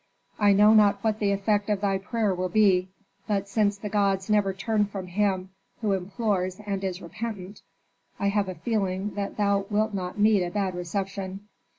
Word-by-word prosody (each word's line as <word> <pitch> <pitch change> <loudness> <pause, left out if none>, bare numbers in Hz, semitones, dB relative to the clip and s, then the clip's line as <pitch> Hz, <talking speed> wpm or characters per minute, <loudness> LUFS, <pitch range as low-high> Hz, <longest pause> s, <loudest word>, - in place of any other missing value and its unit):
"I 205 -1 +5
know 210 +2 +6
not 205 -2 +4
what 220 -1 0
the 205 -1 +1
effect 205 +1 0
of 205 -2 0
thy 195 -2 +1
prayer 215 0 -1
will 185 0 -2
be; 190 -3 +3 0.4
but 200 -2 0
since 205 0 +1
the 210 - -6
gods 200 -1 0
never 205 -2 +3
turn 210 +2 0
from 195 -2 -6
him 190 0 -1 0.3
who 210 -3 +1
implores 190 -1 -1
and 200 -1 -3
is 185 -1 -3
repentant, 200 +2 -6 0.6
I 200 - +1
have 200 -1 0
a 185 - -5
feeling 200 -3 -2
that 200 -1 -4
thou 200 -1 +1
wilt 215 +1 +1
not 185 0 -4
meet 210 -2 +4
a 175 - -2
bad 190 0 -1
reception. 190 +2 -4
200 Hz, 185 wpm, -26 LUFS, 190-210 Hz, 0.6 s, know